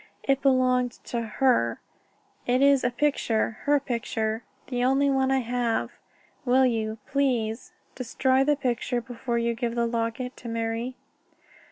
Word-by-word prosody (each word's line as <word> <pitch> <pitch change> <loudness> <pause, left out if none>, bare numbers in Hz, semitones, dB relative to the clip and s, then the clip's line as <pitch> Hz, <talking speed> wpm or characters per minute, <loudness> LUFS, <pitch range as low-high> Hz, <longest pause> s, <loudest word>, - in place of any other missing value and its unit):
"It 275 0 +1
belonged 255 -2 +3
to 235 - -3
her. 225 - +1 0.7
In 250 +2 +3
it - - +7
is 280 -2 +4
a 245 - +3
picture 240 -4 0
her 290 0 +4
picture 230 -4 -2 0.2
the 245 -1 -2
only 270 +2 +3
one 265 -1 +2
I 265 0 +2
have. 240 -1 -1 0.5
Will 260 0 +4
you 220 -3 -1
please 255 +1 -1 0.2
destroy 260 +1 +1
the 295 +1 +3
picture 245 -2 -1
before 240 0 -4
you 235 0 +1
give 235 0 -3
the 235 0 +1
locket 235 +2 -2
to 235 - -8
Marie?" 230 +2 -2
245 Hz, 150 wpm, -26 LUFS, 230-265 Hz, 0.7 s, it